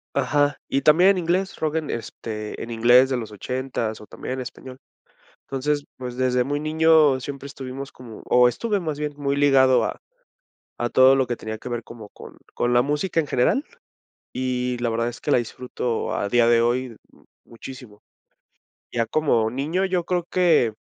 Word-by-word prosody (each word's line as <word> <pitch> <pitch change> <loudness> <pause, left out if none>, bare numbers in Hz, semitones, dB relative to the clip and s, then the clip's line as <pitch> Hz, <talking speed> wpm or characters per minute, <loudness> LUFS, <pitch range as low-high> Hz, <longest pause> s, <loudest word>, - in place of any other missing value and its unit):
Ajá, 145 0 +1
y 135 - 0
también 175 +5 +6
en 195 - +3
inglés, 180 +3 -1
rock 155 0 -1
en 155 -3 -3
este, 110 -2 -6
en 115 - -6
inglés 120 +3 +5
de 130 - 0
los 110 -3 -6
ochentas 120 0 -4
o 105 - -12
también 130 - -6
en 130 - -4
español. 130 +1 -9 0.7
Entonces, 145 +2 -2
pues, 125 -1 -6
desde 125 -1 +1
muy 145 +2 -2
niño 155 -3 +4
siempre 140 +1 -7
estuvimos 135 0 -7
como 120 -3 -12
o 125 0 +5
estuve 205 - -1
más 155 -4 -4
bien 150 0 -3
muy 140 -1 -1
ligado 135 -2 +4
a - - -4 0.8
a 120 0 -1
todo 130 +1 +6
lo 130 - +1
que 120 - -2
tenía 110 -1 -6
que 125 - -8
ver 120 -1 -3
como 115 -2 -11
con - - -13 0.2
con 120 - 0
la 120 - +5
música 150 +6 -1
en 160 - +2
general 140 - +1 0.7
y 125 -1 -1
la 120 -1 0
verdad 115 +1 0
es 120 - -9
que - - -2
la 135 - +5
disfruto 120 0 -3
a 100 - -1
día 120 +2 +3
de 120 0 +4
hoy 120 +2 +1
m 115 - -12 0.5
muchísimo. 120 -3 -11 0.9
Ya 115 -1 0
como 115 -5 +1
niño 155 +9 -1
yo 185 -2 0
creo 180 0 0
que. 160 -11 +3
130 Hz, 185 wpm, -23 LUFS, 120-150 Hz, 0.9 s, también